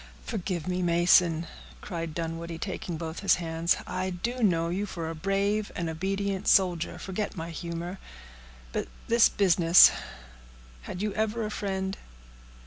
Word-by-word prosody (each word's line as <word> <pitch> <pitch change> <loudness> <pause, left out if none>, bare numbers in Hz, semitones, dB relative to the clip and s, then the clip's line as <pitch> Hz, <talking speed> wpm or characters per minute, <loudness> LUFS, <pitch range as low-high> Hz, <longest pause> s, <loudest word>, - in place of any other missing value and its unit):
"Forgive 185 -7 -3
me, 180 0 -1
Mason," 170 -1 +4 0.3
cried 165 - -5
Dunwoodie, 165 0 -4
taking 175 -2 -4
both 160 0 -5
his 200 - +4
hands. 165 0 0
"I 185 +1 -2
do 235 +8 -3
know 170 -6 +2
you 195 +4 -2
for 170 -4 -5
a 165 - -3
brave 200 +5 0
and 170 -2 -2
obedient 195 +3 -2
soldier; 175 -3 +3
forget 195 +2 -4
my 165 +1 -5
humor. 170 +2 -5 0.7
But - - -2 0.2
this 235 0 +5
business—had - - +2
you 210 -2 -1
ever 220 +1 -1
a 210 - -4
friend?" 190 -2 -3
175 Hz, 135 wpm, -28 LUFS, 165-195 Hz, 0.7 s, this